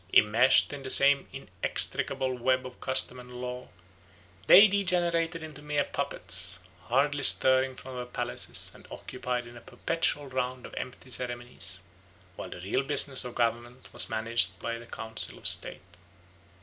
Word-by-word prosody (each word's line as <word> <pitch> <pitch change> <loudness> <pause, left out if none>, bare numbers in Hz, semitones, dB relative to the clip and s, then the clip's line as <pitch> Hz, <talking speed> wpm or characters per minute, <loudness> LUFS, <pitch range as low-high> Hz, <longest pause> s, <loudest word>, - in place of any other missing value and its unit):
Immeshed 115 +7 +4
in 140 - -7
the 130 - -7
same 140 +1 +5
inextricable 130 -1 0
web 130 +1 0
of 125 -1 -11
custom 130 -1 +1
and 125 0 -13
law, 125 0 -6 0.8
they 205 +4 +9
degenerated 175 -4 -1
into 155 -2 -10
mere 150 -1 -1
puppets, 95 -9 -3 0.3
hardly 140 +3 +1
stirring 130 -1 +5
from 130 0 -10
their 125 0 -6
palaces 120 0 -1
and - - -17
occupied 125 -1 -5
in 120 0 -13
a 120 - -12
perpetual 165 +1 -2
round 130 -1 -4
of - - -12
empty 125 0 -8
ceremonies, 120 -6 -4 0.5
while - - -8
the 90 - -9
real 100 +8 -1
business 140 -1 +3
of 125 -1 -8
government 120 +1 -3
was - - -4
managed 110 -4 0
by 115 +6 -5
the 120 - -13
council 110 -1 -2
of - - -17
state. - - 0
130 Hz, 150 wpm, -28 LUFS, 120-140 Hz, 0.8 s, they